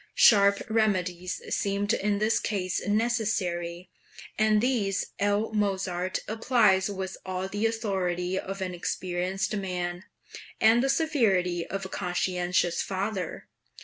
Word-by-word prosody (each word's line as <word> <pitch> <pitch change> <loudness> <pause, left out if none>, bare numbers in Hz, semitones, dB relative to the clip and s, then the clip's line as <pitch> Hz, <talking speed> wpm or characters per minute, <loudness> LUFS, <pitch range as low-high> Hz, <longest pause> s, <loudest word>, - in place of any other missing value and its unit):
Sharp 200 -2 +6
remedies 185 -5 0
seemed 200 0 0
in 205 0 0
this 215 +2 +2
case 185 -4 -2
necessary, 205 -6 -1 0.4
and 215 0 +3
these 210 -5 0
L. 205 +2 +1
Mozart 190 -3 -1
applies 215 -4 +3
with 190 -2 -5
all 185 0 -3
the 205 +3 0
authority 190 -5 -1
of 195 0 -6
an 185 -1 -2
experienced 185 +3 -2
man, 180 -2 -3 0.5
and 225 +2 +5
the 270 - +1
severity 210 - +1
of 195 0 -4
a - - -6
conscientious 180 -1 0
father. 190 -2 -3
195 Hz, 115 wpm, -27 LUFS, 180-215 Hz, 0.5 s, Sharp